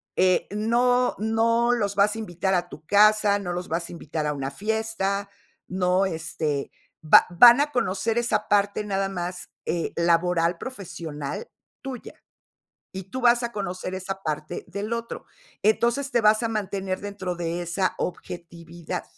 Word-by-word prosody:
eh, 185 -1 +3
no 245 +4 +2
no 230 +2 +2
los 205 -4 0
vas 205 +2 +3
a - - -5
invitar 190 -2 -1
a 175 0 0
tu 155 - -11
casa, 210 +1 +5
no 180 -3 -4
los 180 +1 -4
vas 170 +1 -3
a - - -9
invitar 155 -2 -4
a 150 - 0
una 135 -2 -3
fiesta, 200 +2 -2 0.4
no, 185 +1 +1
este, 155 -4 -3 0.3
va 155 - +7
van 240 +9 +8
a 295 - 0
conocer 220 -2 0
esa 240 0 0
parte 205 0 +2
nada 195 -1 -1
más, 180 -1 -5 0.2
eh, 170 -1 -2
laboral, 170 0 +2
profesional 170 - -6 0.3
tuya, 265 -3 -7 0.8
y 190 0 -5
tú 225 +8 -6
vas 240 0 +5
a 235 0 -3
conocer 185 -2 -4
esa 190 +1 -5
parte 155 -2 -4
del 200 +5 -5
otro. 230 0 -4 0.4
Entonces, 235 +6 +2
te 240 - +2
vas 215 +1 +4
a 230 - 0
mantener 195 -3 -3
dentro 200 -3 -5
de 170 0 -3
esa 175 +2 -1
objetividad. 170 -1 -6
195 Hz, 155 wpm, -25 LUFS, 175-220 Hz, 0.8 s, van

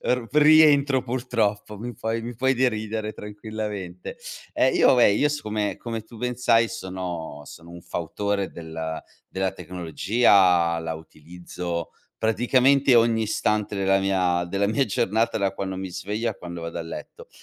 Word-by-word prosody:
r 125 -2 0
rientro 150 -3 +5
purtroppo, 110 -5 -2
mi 120 +3 -6
puoi 115 +2 -3
mi 120 +1 -6
puoi 130 +3 +1
deridere 110 -3 -1
tranquillamente. 105 -4 -6 0.4
Eh, 130 - +3
io - - +5
vabbè, 120 -5 +5
io 145 +8 +2
siccome, 110 -8 -2
come 115 -2 -5
tu 115 +2 -15
ben 125 +2 -2
sai, 115 -1 +3
sono 90 -8 -6
sono 85 +3 -12
un 85 0 -11
fautore 100 +5 -2
della 80 -1 -6 0.3
della 95 0 -2
tecnologia, 90 -1 +2
la 80 0 -4
utilizzo 85 +2 -7 0.3
praticamente 125 +4 +3
ogni 115 -1 +3
istante 105 -1 -1
della 95 0 +2
mia 90 -2 +1
della 100 +3 0
mia 130 +6 +2
giornata, 110 +3 0
da 100 -2 0
quando 95 -1 -4
mi 95 0 -5
sveglio 105 +5 -3
a 105 - -7
quando 85 -2 -8
vado 85 0 -5
a - - -3
letto. 80 0 -9
105 Hz, 150 wpm, -24 LUFS, 90-115 Hz, 0.4 s, rientro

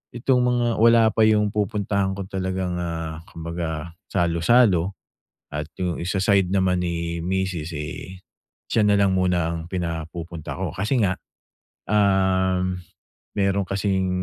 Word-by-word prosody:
itong 125 +2 +2
mga 120 -1 +2
wala 115 0 +6
pa 110 0 +4
yung 105 -1 +3
pupuntahan 100 -2 0
ko 100 - -4
talagang, 95 -2 -2
ah, 80 -2 -4
kumbaga 85 -1 -5 0.2
salo-salo 90 +2 +3 0.5
at 75 +1 -5
yung 90 -2 -1
sa 90 +3 -2
side 95 -2 +3
naman 95 -2 +2
ni 85 -1 -2
misis, 90 -3 -2
eh, 80 +4 -6 0.5
siya 110 - +2
na 105 -1 +4
lang 95 -2 +3
muna 90 -3 +2
ang 85 +2 -7
pinapupunta 85 -1 -5
ko. - - -3
Kasi 110 +7 0
nga, 95 -3 +2 0.7
um, 95 -2 +2 0.6
meron 100 -1 +1
kasing 95 -1 0
95 Hz, 130 wpm, -23 LUFS, 85-100 Hz, 0.7 s, wala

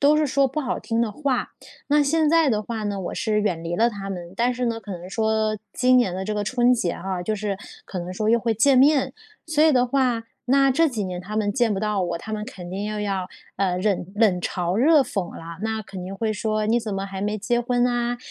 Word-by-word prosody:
都 290 +2 +5
是 305 0 +2
说 275 0 +2
不 270 - -5
好 290 - -1
听 230 -1 -1
的 220 -3 -1
话。 265 0 -1 0.4
那 295 +1 +4
现 310 +2 +2
在 330 -1 +4
的 215 -4 +1
话 220 0 -4
呢， 205 -1 -2
我 180 - -4
是 215 -1 0
远 175 -6 -1
离 170 +1 -3
了 230 +5 +3
他 200 -3 -7
们， 175 -3 -6
但 240 +4 +1
是 250 0 -2
呢， 230 -1 -1
可 205 - -10
能 180 0 -7
说 220 0 +1 0.2
今 255 0 +4
年 240 -7 +2
的 190 +1 -3
这 215 - -2
个 210 - -1
春 245 +3 +3
节 205 -9 0
哈， 185 0 -4
就 215 +4 -1
是 200 -2 -3 0.3
可 185 - -6
能 175 +1 -5
说 215 +3 0
又 235 - +5
会 230 0 0
见 260 +5 +4
面， 280 +1 +4 0.3
所 310 -1 +2
以 315 - +6
的 250 -2 +3
话， 250 -3 +1 0.2
那 275 +2 +4
这 320 +5 +3
几 225 -7 -3
年 180 -1 -4
他 210 +4 -6
们 205 -1 +1
见 240 -3 +2
不 195 - -1
到 210 -2 0
我， 170 -1 -2
他 220 - -8
们 210 0 -3
肯 180 -4 -9
定 195 +2 -3
又 210 0 -3
要， 195 -3 -2 0.3
呃， 185 -2 0
忍 195 -1 0
冷 205 -5 +3
嘲 175 0 -2
热 295 +8 +5
讽 195 -9 -2
了， 165 0 -9
那 220 0 -1
肯 195 -3 -8
定 185 +2 -6
会 220 +1 -1
说 215 0 -1
“你 235 +2 +2
怎 220 -2 -4
么 195 0 -3
还 195 -1 -6
没 210 +1 -1
结 240 +4 0
婚 245 0 +1
呢？ 240 0 0
215 Hz, 275 characters per minute, -23 LUFS, 195-245 Hz, 0.4 s, 以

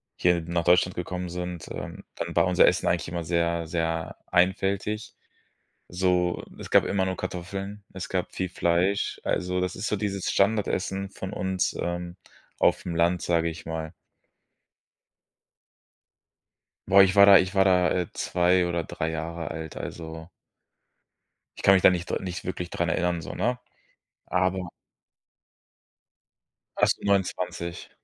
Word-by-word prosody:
hier 90 -1 +2
nach 85 +1 -2
Deutschland 90 +1 +3
gekommen 90 0 -4
sind, 90 -2 -5
ähm, - - -7
dann - - -5
war 85 - +4
unser 90 -1 +5
Essen - - +2
eigentlich 85 - 0
immer 85 0 -4
sehr, 85 0 0
sehr 80 0 -2
einfältig. 100 +4 0 0.7
So, 90 -1 +1
es - - -9
gab - - +6
immer 95 -1 0
nur 95 0 -2
Kartoffeln, 100 +3 -5
es 95 -1 -5
gab 95 -1 -2
viel 95 -1 -2
Fleisch. 90 +3 0
Also, 90 0 -1
das 90 0 -2
ist 95 +2 -3
so 105 - 0
dieses 100 -2 -2
Standardessen 100 -1 0
von 95 -1 -7
uns, 95 -1 -1
ähm, 85 0 -3 0.4
aufm 85 - +1
Land, 85 +1 +2
sage 85 -1 +1
ich 80 +1 -9
mal. 80 0 -5 3.0
Boah, 100 +1 +8
ich 95 0 +3
war 100 0 +8
da 100 -1 +10
ich 95 +2 -1
war 95 -1 +5
da, 90 -2 +4
äh, 90 -2 0
2 90 0 +2
oder 85 -1 -1
3 80 +1 -3
Jahre 80 0 -4
alt, 80 -1 -6
also 80 0 -7 1.3
ich - - -9
kann 95 - +7
mich 95 - +3
da - - +8
nicht 90 -1 -3
dr - - -1
nicht 90 -2 -5
wirklich 90 -1 -4
dran 85 - -1
erinnern 85 +1 0
so, - - -7
ne. 125 +2 0 0.7
Aber 90 0 0 2.1
Fast - - +3
29. 90 -3 -1
90 Hz, 145 wpm, -26 LUFS, 85-95 Hz, 3.0 s, da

